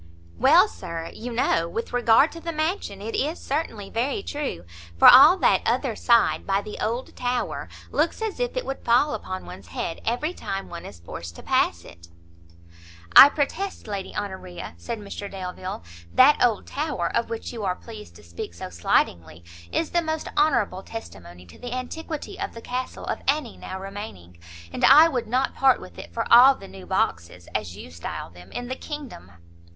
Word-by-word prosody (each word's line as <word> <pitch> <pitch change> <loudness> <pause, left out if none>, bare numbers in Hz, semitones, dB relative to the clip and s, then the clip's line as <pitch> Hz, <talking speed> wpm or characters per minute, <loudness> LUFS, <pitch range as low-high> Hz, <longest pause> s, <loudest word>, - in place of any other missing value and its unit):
"Well, - - +6
Sir, 165 - -7
you 245 +2 -7
know, 170 -8 +1
with 230 +6 -5
regard 245 +4 +4
to 335 - -9
the 335 0 -4
mansion, 310 - -3
it 225 - -5
is 305 +5 -1
certainly 250 -9 -3
very 275 - -1
true, 290 - -4 0.3
for - - +8
all 285 +9 +10
that - - +3
other - - 0
side, 235 -2 +2
by 195 +1 +1
the 210 - -8
old 235 +4 -3
tower, 245 0 -2 0.2
looks - - 0
as 445 0 -4
if - - -2
it - - -2
would 270 - -5
fall 250 +6 +3
upon 185 0 -5
one's 95 -2 -11
head 125 - -4
every 275 +9 -1
time 195 - -5
one 170 - -8
is 85 - -12
forced 85 0 -8
to - - -11
pass - - +1
it." 85 0 -14 1.1
"I 280 - +12
protest, 320 +7 -3
Lady 200 -2 -5
Honoria," 185 -3 -6
said 235 -1 -5
Mr 200 -1 -7
Delvile, 185 - -6 0.3
"that 270 +2 +6
old 230 -4 +2
tower, 280 - -2
of 235 - 0
which 230 +1 -5
you 225 -3 -6
are 185 -2 0
pleased 215 0 -12
to - - -15
speak 85 0 -8
so 90 - -7
slightingly, 85 -1 0 0.3
is 330 - -1
the 345 - +2
most 315 -1 -3
honourable 235 -11 +2
testimony 90 - -10
to 85 - -16
the 245 0 -6
antiquity 320 +8 -6
of 395 -8 -4
the 230 - -8
castle 250 +2 -5
of - - -3
any 280 -4 0
now 190 - -7
remaining, 195 - -9 0.3
and - - -4
I 300 +4 +9
would 250 -6 -2
not 255 +4 0
part 265 -1 +4
with 90 -2 -12
it 85 - -10
for - - -2
all 260 +3 +9
the 195 - -12
new 190 -1 -12
boxes, 85 - -2
as 85 +3 -3
you 85 - -10
style 85 -1 -6
them, 90 +2 -15
in 245 - -5
the 260 - -3
kingdom." 270 - -8
225 Hz, 190 wpm, -24 LUFS, 170-275 Hz, 1.1 s, I